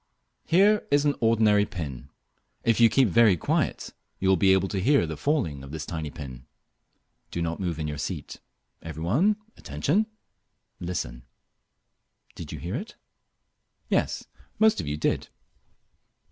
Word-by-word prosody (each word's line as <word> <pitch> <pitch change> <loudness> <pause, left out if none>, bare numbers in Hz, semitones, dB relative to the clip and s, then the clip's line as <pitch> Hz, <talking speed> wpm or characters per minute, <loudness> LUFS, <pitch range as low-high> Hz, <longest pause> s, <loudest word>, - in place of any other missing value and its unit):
Here 205 +5 +4
is 145 +1 +3
an 145 - +3
ordinary 110 -3 +4
pin. 70 -9 -6 0.5
If 115 -1 +2
you 115 -1 +7
keep 130 +2 +4
very 105 -1 +5
quiet - - -1 0.2
you 95 - 0
will 95 - +6
be 95 +2 +4
able 95 0 +3
to 95 - -2
hear 135 +1 +4
the 80 -1 -5
falling 80 - -1
of 70 - -10
this 75 0 -5
tiny 80 -2 -4
pin. 65 -5 -9 0.8
Do - - -4
not 85 0 -2
move 90 -5 -2
in 80 -1 -3
your 75 -1 -4
seat. - - -5 0.4
Every 80 -1 -7
one, 155 - +3 0.2
attention! 145 - 0 0.7
Listen. 75 -9 -4 1.1
Did - - -8
you - - -5
hear 85 +3 -5
it? 215 - -5 0.9
Yes, - - 0 0.3
most 220 0 +4
of 80 - -7
you 75 +1 -2
did. - - 0
95 Hz, 150 wpm, -26 LUFS, 75-130 Hz, 1.1 s, you